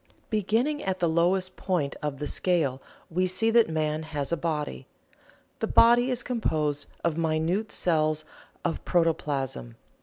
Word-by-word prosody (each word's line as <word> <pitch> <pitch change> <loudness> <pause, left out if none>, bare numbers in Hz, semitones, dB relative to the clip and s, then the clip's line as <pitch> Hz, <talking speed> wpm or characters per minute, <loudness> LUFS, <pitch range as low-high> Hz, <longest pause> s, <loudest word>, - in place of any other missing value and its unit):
Beginning 225 +8 +1
at 190 -1 -1
the 175 - +1
lowest 180 +3 +1
point 175 -7 -1
of 150 -2 -3
the 150 - -4
scale 150 -6 0 0.3
we 185 +3 +1
see 225 +5 +1
that 230 -4 +5
man 155 -1 -1
has 150 -2 -4
a - - +3
body. 155 -3 -3 0.7
The - - -1
body 240 +2 +5
is 250 -1 0
composed 150 - -1 0.2
of 165 -1 0
minute 165 +6 0
cells 155 -3 +1 0.4
of - - -2
protoplasm. 140 - -1
165 Hz, 145 wpm, -27 LUFS, 150-190 Hz, 0.7 s, that